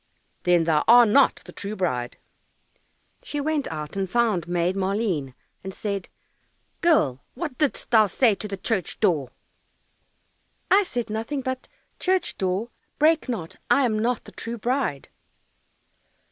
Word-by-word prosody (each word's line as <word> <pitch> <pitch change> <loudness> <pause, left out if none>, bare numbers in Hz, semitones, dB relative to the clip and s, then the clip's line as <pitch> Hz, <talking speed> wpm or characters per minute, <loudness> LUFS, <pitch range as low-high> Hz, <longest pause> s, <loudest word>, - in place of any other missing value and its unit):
"Then 175 -2 +4
thou 160 -2 +2
art 240 0 +8
not 275 +5 +4
the - - -10
true 205 +1 -5
bride." 125 -11 -2 1.0
She 295 - -5
went 295 -1 -1
out 150 0 -6
and 195 -1 -2
found 215 -7 +1
Maid 175 +1 0
Maleen, 190 - -1 0.3
and 190 0 -7
said, 200 -3 -4 0.7
"Girl, 145 - +2
what 305 -7 -5
didst 295 -5 0
thou 220 -3 +6
say 225 +4 +3
to 210 - -6
the 195 -1 -5
church 195 -1 -2
door?" 160 - +1 1.4
"I 400 +1 +6
said 240 - -4
nothing 230 +6 -3
but, 260 0 -4 0.3
"Church 375 0 0
door, 190 +5 -1 0.3
break 310 -1 +3
not, 180 -10 -4
I 275 - +4
am 215 -3 0
not 235 +1 0
the - - -13
true 235 +1 -5
bride." 245 - -1
215 Hz, 145 wpm, -24 LUFS, 180-255 Hz, 1.4 s, art